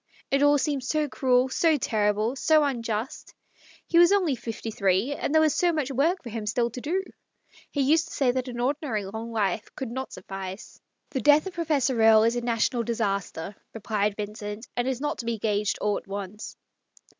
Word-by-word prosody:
It 275 0 +3
all 290 0 +5
seems 270 -1 -1
so 305 +1 +1
cruel, 255 -2 +2
so 315 +3 +3
terrible, 215 0 0
so 310 +2 +4
unjust. 230 -4 -3 0.5
He 340 - +3
was 345 +1 +7
only 365 -9 +2
fifty 225 -1 -6
three, 200 +6 +1
and 285 - -3
there 315 0 +5
was 310 - +3
so 350 -1 +2
much 300 -4 -2
work 320 +8 +1
for 240 - -7
him 220 -1 -5
still 235 +2 0
to 250 - -7
do. 365 +8 -1 0.7
He 285 - -1
used 315 +5 +3
to - - -10
say 265 -3 +3
that 255 +1 -2
an 240 -1 -6
ordinary 255 -5 -1
long 220 +4 -6
life 210 -2 -1
could 260 -3 -5
not 260 +2 -5
suffice 190 +1 -8
" - - -53
" - - -48
The 265 -4 -2
death 295 +2 +5
of 380 - -6
Professor 280 -8 0
Erie 220 0 +7
is 230 - 0
a 240 - -1
national 235 0 0
d 235 +1 -2
isaster," 200 -4 -2 0.2
replied 210 -2 -1
Vincent, 210 +1 -6
" - - -45
and 245 +1 0
is 265 -1 -2
not 295 +1 -2
to 235 - -5
be 230 -1 -1
gauged 210 -1 0
all 205 -1 +1
at - - -23
once." 200 +1 -7
240 Hz, 215 wpm, -26 LUFS, 215-290 Hz, 0.7 s, was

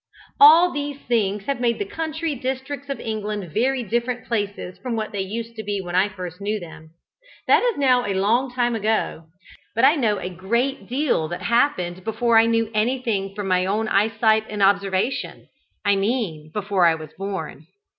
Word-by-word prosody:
All 360 -5 +8
these 285 -1 -4
things 210 -6 -1
have 270 -1 -2
made 235 -1 +1
the 410 - -2
country 325 -4 -3
districts 265 +2 -5
of 275 - -3
England 210 -6 -4
very 255 +2 +1
different 240 +3 -2
places 205 -5 -3
from 235 +3 -3
what 215 -1 -3
they 200 - -2
used 225 +4 -5
to 220 - -5
be 205 -1 -2
when 175 -2 -6
I 190 +3 +3
first 180 -2 -8
knew 210 +1 -1
them. 160 -3 -11 0.6
That - - +5
is 485 -3 0
now 255 -4 +3
a 200 - -1
long 230 +7 +1
time 240 -1 0
ago, 215 -6 -1 0.5
but 230 +4 +4
I 280 - +7
know 225 -8 +1
a - - -4
great 205 +6 -2
deal 255 - 0
that 175 +3 -6
happened 185 -6 +1
before 230 +1 +3
I 225 - +4
knew 230 -1 +1
anything 215 -4 -1
from 205 -2 -4
my 185 0 +2
own 215 +3 0
eyesight 220 +1 +2
and 210 -2 -1
observation 195 +4 0 0.4
I 200 0 +4
mean 195 -8 -2
before 195 -2 +2
I 165 - +3
was 155 -2 -10
born. 185 -6 -6
215 Hz, 185 wpm, -22 LUFS, 195-250 Hz, 0.6 s, All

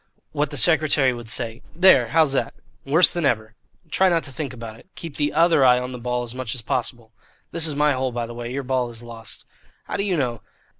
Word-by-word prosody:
What 150 -1 -1
the 145 - -5
secretary 145 -3 +4
would 120 -2 -7
say 115 0 -2
There! 170 -9 +6
How's 155 +1 +3
that?" - - -1 0.3
"Worse 155 +6 +5
than 175 - -3
ever." 110 -5 0 0.4
"Try 190 0 +3
not 170 -2 +1
to 140 - -9
think 140 -1 -5
about 115 -3 -9
it. 115 - -18
Keep 165 -4 -8
the 145 -1 0
other 165 -2 +4
eye 125 -1 +6
on 125 +1 -4
the 125 - -7
ball 125 0 -2
as 120 -1 -7
much 130 -1 -4
as 120 - -5
possible. 120 -1 -3 0.4
This 165 -1 +2
is 150 - -1
my 150 0 +3
hole, 130 0 -2
by 120 -1 -3
the 120 - -9
way. 120 0 -6
Your 140 +2 -3
ball 130 -1 -1
is 115 0 -11
lost." 115 -1 -9 0.4
"How - - -5
do 200 - 0
you 190 -4 0
know?" 120 -5 -2
130 Hz, 240 wpm, -22 LUFS, 120-150 Hz, 0.4 s, There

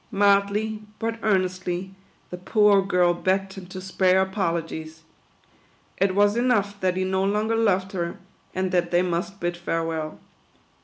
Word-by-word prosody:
Mildly, 205 +2 +2 0.2
but 230 0 -3
earnestly, 185 -2 -1 0.4
the 180 - -5
poor 205 +1 +4
girl 180 -2 +2
begged 190 +2 -1
him 190 -2 -10
to 185 +1 -8
spare 190 0 +2
apol 190 -3 -1
ogies. 160 0 -8 1.0
It 190 0 +1
was 205 +1 +4
enough 210 -5 +1
that 185 -1 0
he 185 - +1
no 190 0 0
longer 210 +3 +1
loved 195 -4 +1
her, 170 -3 -3 0.4
and 185 0 -1
that 175 -1 +1
they 175 +1 +3
must 180 +3 -3
bid 175 -1 -2
farewell. 165 -2 -3
190 Hz, 150 wpm, -24 LUFS, 180-200 Hz, 1.0 s, poor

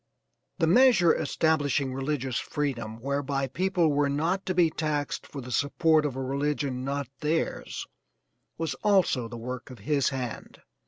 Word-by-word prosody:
The 165 - +2
measure 190 -2 +6
establishing 145 -3 +1
religious 135 -2 -2
freedom, 120 -7 -3
whereby 140 +1 -1
people 180 +4 +1
were 145 0 +2
not 165 +7 -1
to 185 - 0
be 170 -3 +4
taxed 150 -2 -2
for 140 - -7
the 125 0 -8
support 150 +5 +3
of 135 - -6
a 135 - -3
religion 140 -1 -1
not 140 0 -2
theirs, 160 +2 -2 0.7
was 165 -1 -2
also 185 - +3
the 120 +1 -8
work 125 +2 -6
of 125 - -10
his 145 -3 +2
hand. 130 -4 -6
145 Hz, 150 wpm, -27 LUFS, 130-160 Hz, 0.7 s, measure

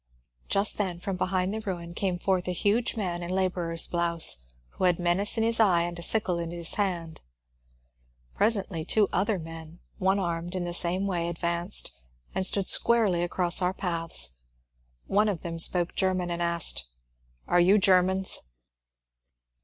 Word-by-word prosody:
Just 200 +2 +1
then 185 -4 -2
from 195 +1 -4
behind 185 +1 -1
the 220 - -4
ruin 175 -5 -6
came 185 -1 -2
forth 185 0 -1
a 180 - -1
huge 215 +7 0
man 180 -5 -3
in 175 - -6
labourer's 180 -3 0
blouse, 170 - +1 0.3
who 185 - -3
had 175 -2 +3
menace 180 +5 +1
in 225 - +1
his 230 0 +1
eye 180 -6 +4
and 175 0 -5
a - - -6
sickle 180 -2 0
in 170 -1 -4
his 170 -1 -1
hand. 175 -5 -2 1.1
Presently 200 -6 0
two 205 +4 +3
other 200 +3 +1
men, 165 0 -10 0.2
one 190 +1 +2
armed 175 -1 -3
in 185 - -2
the 175 - -4
same 180 +2 -1
way, 175 -3 -2
ad 170 - -6
vanced 170 +3 +1 0.4
and 190 0 +4
stood 195 0 +1
squarely 215 -7 +3
across 175 +1 0
our 180 +1 0
path. 165 - -1 0.8
One 210 +2 +2
of 185 -6 -3
them 165 -1 -6
spoke 175 +1 +3
German 185 -2 -1
and 170 0 -3
asked, 170 -1 +3
^' - - -6 0.7
Are 175 - +3
you 185 +4 +5
Germans 190 -1 +3
180 Hz, 170 wpm, -27 LUFS, 170-195 Hz, 1.1 s, you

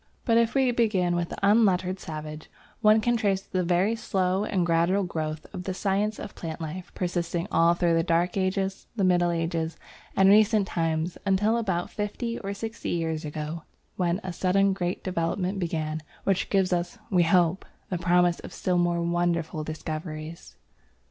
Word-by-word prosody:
But 230 -2 +4
if 230 +2 +1
we 265 -2 +3
begin 200 -7 +1
with 175 -1 -1
the - - -6
unlettered 190 -3 +3
savage, 155 -2 -7 0.3
one 215 0 +5
can 240 +2 +2
trace 195 -3 0
the 185 - -2
very 180 +5 +2
slow 190 -3 0
and 190 -4 0
gradual 170 +4 +2
growth 155 -3 -4
of 180 -2 -6
the 190 - -3
science 205 +2 0
of 205 - -7
plant 165 -1 -6
life 170 +3 -6
persisting 175 0 -2
all 170 +1 +4
through 175 -1 +2
the 165 - +3
Dark 170 +1 +1
Ages, 190 0 -1
the 205 - 0
Middle 175 -1 +3
Ages, 165 -1 -2 0.4
and 190 - +5
recent 210 +1 +5
times, 165 0 -1
until 205 +3 +2
about 190 -7 -1
fifty 225 +3 -3
or 200 -1 -4
sixty 225 +2 -5
years 160 -2 -1
ago, 155 +2 -5 0.3
when 175 0 0
a 185 -1 -4
sudden 195 +2 +2
great 180 -1 -3
development 185 +2 -1
began, 160 -3 -2 0.2
which 195 -1 0
gives 190 -2 +2
us, 175 0 -2
we 180 -2 +4
hope, 175 +1 +3 0.3
the 180 - -1
promise 175 0 +3
of - - -9
still 180 -1 0
more 175 -1 +1
wonderful 170 -2 0
discoveries. 155 +1 -6
180 Hz, 170 wpm, -26 LUFS, 170-195 Hz, 0.4 s, one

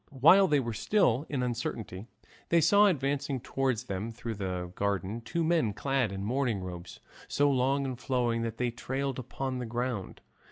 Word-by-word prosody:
While 190 +8 +7
they 150 -3 +3
were 120 -3 -3
still 140 - +2
in 135 -4 -1
uncertainty 115 -4 -4 0.4
they 170 - +5
saw 205 +6 +6
advancing 140 -5 0
towards 130 -2 -1
them 105 0 -4
through 115 0 -5
the 90 -3 -4
garden 100 +3 -2
two 165 +8 -2
men 160 -10 +2
clad 135 -1 0
in 95 0 -4
mourning 120 -2 0
robes 90 -1 -8 0.3
so 145 0 +2
long 135 +1 +1
and 130 -2 -4
flowing 120 -3 0
that 115 -1 -3
they 125 -1 0
trailed 135 +2 -3
upon 130 +1 -4
the 125 - -4
ground. 120 -4 -3
125 Hz, 170 wpm, -30 LUFS, 110-140 Hz, 0.4 s, While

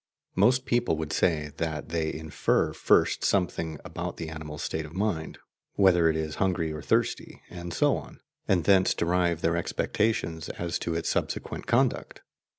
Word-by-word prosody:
Most 125 +7 +3
people 120 -10 +1
would 80 -1 -4
say 75 -4 +1
that 80 -3 -3
they 80 -1 -1
infer 80 -1 0
first - - +3
something 85 -5 0
about - - -5
the 80 -2 -5
animal's 80 +1 -7
state 80 -4 -2
of 75 +2 -11
mind 95 -5 -2 0.4
whether 90 -4 +5
it 80 - 0
is 80 -1 -3
hungry 90 -5 +1
or 75 - -6
thirsty - - -1
and 85 -1 -7
so - - +2
on - - -10 0.3
and 90 -3 +2
thence 95 0 +4
derive 85 -1 +1
their 85 +1 +2
expectations 85 -1 -1
as 85 0 -3
to 85 - -2
its 85 - -2
subsequent - - -2
conduct. - - +1
85 Hz, 160 wpm, -27 LUFS, 80-95 Hz, 0.4 s, whether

